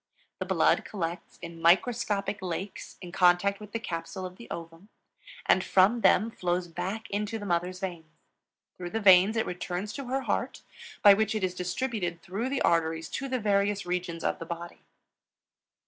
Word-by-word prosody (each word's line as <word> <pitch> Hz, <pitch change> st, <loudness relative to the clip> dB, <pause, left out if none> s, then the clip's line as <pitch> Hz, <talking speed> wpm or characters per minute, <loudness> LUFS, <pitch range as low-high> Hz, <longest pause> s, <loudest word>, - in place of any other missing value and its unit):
The -, -, -2 dB
blood -, -, +3 dB
collects 175 Hz, -4 st, -5 dB
in 170 Hz, -1 st, -8 dB
microscopic 200 Hz, +2 st, +2 dB
lakes 185 Hz, +2 st, -5 dB
in 180 Hz, -2 st, -8 dB
contact 180 Hz, +2 st, +3 dB
with 210 Hz, -1 st, -11 dB
the 230 Hz, -, -1 dB
capsule 180 Hz, -1 st, -5 dB
of 185 Hz, 0 st, -8 dB
the 235 Hz, -, -12 dB
ovum, 165 Hz, +4 st, -8 dB, 0.6 s
and 185 Hz, -, +4 dB
from 200 Hz, +5 st, +4 dB
them 220 Hz, +2 st, +4 dB
flows 180 Hz, -2 st, -1 dB
back 190 Hz, +7 st, -4 dB
into 210 Hz, +2 st, -2 dB
the 205 Hz, -, -7 dB
mother's 180 Hz, 0 st, -1 dB
veins. 170 Hz, -4 st, -5 dB, 0.7 s
Through 175 Hz, -1 st, -5 dB
the 225 Hz, -, -2 dB
veins 195 Hz, +1 st, +6 dB
it 220 Hz, -, +1 dB
returns 180 Hz, +3 st, -4 dB
to 275 Hz, -, -6 dB
her 265 Hz, +2 st, -1 dB
heart, -, -, -2 dB, 0.4 s
by 205 Hz, -, +10 dB
which 220 Hz, +2 st, +1 dB
it 215 Hz, -, -1 dB
is 185 Hz, -1 st, 0 dB
distributed 180 Hz, -1 st, -3 dB
through 210 Hz, +8 st, -3 dB
the 275 Hz, 0 st, -1 dB
arteries 165 Hz, -1 st, +1 dB
to 275 Hz, -, -4 dB
the 255 Hz, -, 0 dB
various 205 Hz, -1 st, +1 dB
regions 175 Hz, -2 st, -3 dB
of -, -, -1 dB
the 165 Hz, -, -6 dB
body. 170 Hz, 0 st, -7 dB
185 Hz, 175 wpm, -28 LUFS, 175-210 Hz, 0.7 s, by